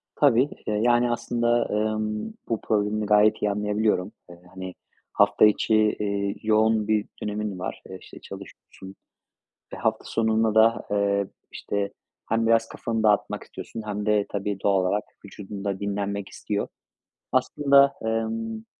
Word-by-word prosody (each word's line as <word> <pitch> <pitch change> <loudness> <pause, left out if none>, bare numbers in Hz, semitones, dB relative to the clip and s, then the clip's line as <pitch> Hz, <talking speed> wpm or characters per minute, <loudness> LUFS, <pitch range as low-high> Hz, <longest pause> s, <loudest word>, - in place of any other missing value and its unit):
Tabii. 140 -1 +4 0.2
Iıı, 105 - 0
yani, 120 0 +3
aslında, 120 0 +1
ımm, 110 - -1 0.2
bu 115 - -1
problemini 105 0 0
gayet 105 +1 +4
iyi 105 - +1
anlayabiliyorum. 105 -1 0 0.2
Iıı, 85 - -12 0.2
hani, 95 -1 -7 0.4
hafta 100 +1 +5
içi, 110 0 +3
ııı, 100 -1 -1
yoğun 110 0 +3
bir 105 -1 +1 0.2
dönemin 105 -2 -3
var. 95 - -5
Eee, 95 - -7
işte - - -13
çalışıyorsun. 95 +1 -11 0.8
Ve - - -5
hafta - - -1
sonunda 110 -1 +1
da, 115 +1 +4
eee, 100 -1 +1 0.2
işte 100 -1 -3 0.4
hem 115 0 +1
biraz 115 0 +3
kafanı 115 -1 -3
dağıtmak 105 -1 +2
istiyorsun 115 - -8
hem 105 0 -3
de 105 -1 +2
tabii 100 0 -3
doğal 100 -2 +3
olarak 100 +3 0 0.2
vücudun 100 0 -8
da 100 -1 -2
dinlenmek 100 0 -3
istiyor. 100 -1 -3 0.6
Aslında, 140 -1 +4
ımm, 115 0 -2
105 Hz, 140 wpm, -25 LUFS, 100-115 Hz, 0.8 s, hafta